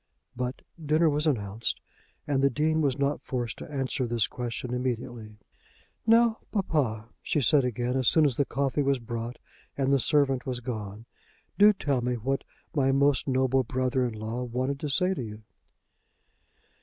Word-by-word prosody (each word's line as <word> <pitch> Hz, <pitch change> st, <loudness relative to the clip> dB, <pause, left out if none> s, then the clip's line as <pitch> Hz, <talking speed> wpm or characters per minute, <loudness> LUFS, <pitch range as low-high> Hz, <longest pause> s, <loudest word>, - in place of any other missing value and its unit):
But 125 Hz, 0 st, -4 dB, 0.2 s
dinner 155 Hz, +2 st, +3 dB
was 150 Hz, +2 st, 0 dB
announced, 110 Hz, -5 st, -1 dB, 0.5 s
and 140 Hz, -2 st, +1 dB
the 140 Hz, -, +4 dB
Dean 155 Hz, +4 st, +1 dB
was 140 Hz, -3 st, +1 dB
not 140 Hz, +1 st, 0 dB
forced 120 Hz, -3 st, -3 dB
to -, -, -8 dB
answer 135 Hz, -2 st, -1 dB
this 115 Hz, -2 st, +1 dB
question 125 Hz, 0 st, -5 dB
immediately. 120 Hz, -3 st, -4 dB, 0.7 s
"Now, 230 Hz, 0 st, +5 dB
papa," 130 Hz, -, -1 dB
she -, -, 0 dB
said 140 Hz, +1 st, +4 dB
again, 125 Hz, +1 st, -1 dB
as 130 Hz, -3 st, +1 dB
soon 160 Hz, -2 st, +5 dB
as 135 Hz, -5 st, +2 dB
the 140 Hz, -, +2 dB
coffee 140 Hz, +1 st, -1 dB
was 140 Hz, -1 st, +2 dB
brought 115 Hz, 0 st, -5 dB, 0.4 s
and 135 Hz, 0 st, +2 dB
the 140 Hz, -, +4 dB
servant 135 Hz, -1 st, +2 dB
was 125 Hz, -2 st, -1 dB
gone, 110 Hz, -3 st, -6 dB, 0.5 s
"do 210 Hz, +1 st, +8 dB
tell 145 Hz, -10 st, -1 dB
me 125 Hz, +1 st, -1 dB
what 135 Hz, +4 st, -2 dB, 0.3 s
my 135 Hz, -2 st, +3 dB
most 140 Hz, +1 st, +2 dB
noble 130 Hz, 0 st, +2 dB
brother 130 Hz, +2 st, 0 dB
in 120 Hz, -3 st, -2 dB
law 110 Hz, +3 st, -4 dB
wanted 130 Hz, +3 st, -2 dB
to 150 Hz, -, -3 dB
say 180 Hz, +6 st, +2 dB
to 160 Hz, -, -4 dB
you?" 110 Hz, -2 st, -8 dB
130 Hz, 170 wpm, -27 LUFS, 120-145 Hz, 0.7 s, do